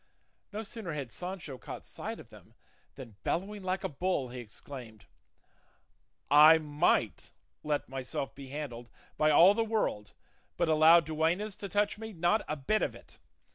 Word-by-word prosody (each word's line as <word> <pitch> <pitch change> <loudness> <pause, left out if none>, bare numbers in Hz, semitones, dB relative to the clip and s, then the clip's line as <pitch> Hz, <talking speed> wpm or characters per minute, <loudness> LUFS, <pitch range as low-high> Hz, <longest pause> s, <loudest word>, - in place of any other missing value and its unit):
No 215 +2 -4
sooner 215 -6 -6
had 140 -5 -5
Sancho 175 - -6
caught - - -8
sight - - -6
of - - -13
them - - -17 0.4
than, 115 -6 -11
bellowing 200 +4 -2
like 185 0 -2
a - - 0
bull, 145 -3 -2
he 125 +1 -7
exclaimed, 115 -1 -11 1.3
"I 155 +2 +9
might 145 - 0 0.3
let 150 -1 -1
myself 135 +1 -5
be 140 -1 -10
handled 125 -5 -6 0.3
by 155 - +3
all 170 +6 +7
the 225 +2 +1
world; 215 - -2 0.4
but 170 - +1
allow 160 +2 +7
duennas 165 +6 -1
to 200 - -7
touch 205 +2 0
me 220 -1 -7
not 175 +5 +1
a 150 - -2
bit 215 +10 0
of - - -1
it! - - -17
155 Hz, 160 wpm, -31 LUFS, 135-190 Hz, 1.3 s, I